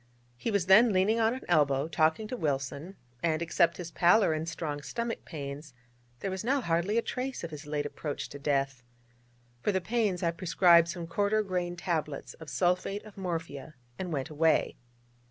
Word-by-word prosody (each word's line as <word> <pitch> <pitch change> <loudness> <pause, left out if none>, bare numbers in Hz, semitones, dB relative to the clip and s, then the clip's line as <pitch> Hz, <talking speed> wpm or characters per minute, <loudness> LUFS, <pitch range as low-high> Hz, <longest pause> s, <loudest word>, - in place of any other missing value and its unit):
He 120 - -3
was 200 -5 +1
then 210 +5 +7
leaning 200 +4 +2
on 225 +2 +2
an 260 - -8
elbow, 145 -4 +3
talking 160 +6 +1
to - - -3
Wilson, 145 - -3 0.3
and 160 -2 +1
except 170 0 +2
his 170 -2 -6
pallor, 175 +1 +4
and 155 +2 -3
strong 150 -4 -4
stomach 235 +8 -4
pains, 140 -2 -7 0.5
there 195 - -2
was 190 +1 -4
now 270 +5 +2
hardly 175 0 0
a 230 - +2
trace 260 -3 -4
of 165 - -5
his 150 0 -9
late 145 0 -2
approach 145 0 -4
to 140 - -9
death. 135 -3 0 0.8
For 210 - +1
the 190 - +1
pains 200 -2 0
I 170 - +2
prescribed 170 0 +4
some 170 0 -5
quarter 205 +5 +1
grain 180 -3 -2
tablets 160 -5 -3
of 160 -2 -11
sulphate 185 +3 0
of 215 - -13
morphia, 165 -6 -5 0.2
and 180 -2 -4
went 140 -1 -3
away. 160 +1 +2
170 Hz, 180 wpm, -29 LUFS, 150-195 Hz, 0.8 s, then